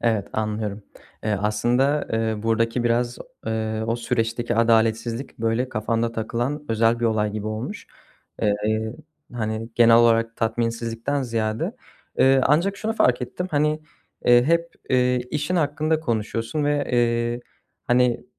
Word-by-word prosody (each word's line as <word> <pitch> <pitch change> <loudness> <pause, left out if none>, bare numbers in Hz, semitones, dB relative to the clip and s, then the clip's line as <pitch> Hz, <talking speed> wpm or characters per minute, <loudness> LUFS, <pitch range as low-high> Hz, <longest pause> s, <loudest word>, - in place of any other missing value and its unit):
Evet, 110 -4 0
anlıyorum. 105 -1 -3 0.4
Eee, 110 - 0
aslında, 120 +8 +1
eee, 110 -1 -1
buradaki 115 +2 +1
biraz, 120 +1 +1
o - - -4 0.2
ııı, 110 0 -2
o 115 - 0
süreçteki 120 0 -1
adaletsizlik 115 +2 +1
böyle 115 +3 0
kafanda 115 0 -1
takılan 120 +6 -2
özel 115 +1 +2
bir - - 0
olay 110 -2 +1
gibi 105 0 -4
olmuş. 110 - -5 0.6
Eee, 110 +2 0 0.4
hani, 110 -1 -3
genel 115 -1 +6
olarak 115 -1 +3
tatminsizlikten 115 +4 -1
ziyade. 115 -3 -2 0.4
Eee, 135 0 +5
ancak 170 +8 +2
şunu 220 +2 -2
fark 125 - +2
ettim. 130 +9 -4
Hani, 150 +1 +1 0.4
hep, 165 +8 +4 0.2
eee, 125 -1 +3
işin 150 +5 -1
hakkında 155 0 +1
konuşuyorsun 115 +2 -2
ve, 145 0 +1
eee, 120 0 +1 0.5
hani, 125 0 +2
115 Hz, 130 wpm, -23 LUFS, 110-130 Hz, 0.6 s, genel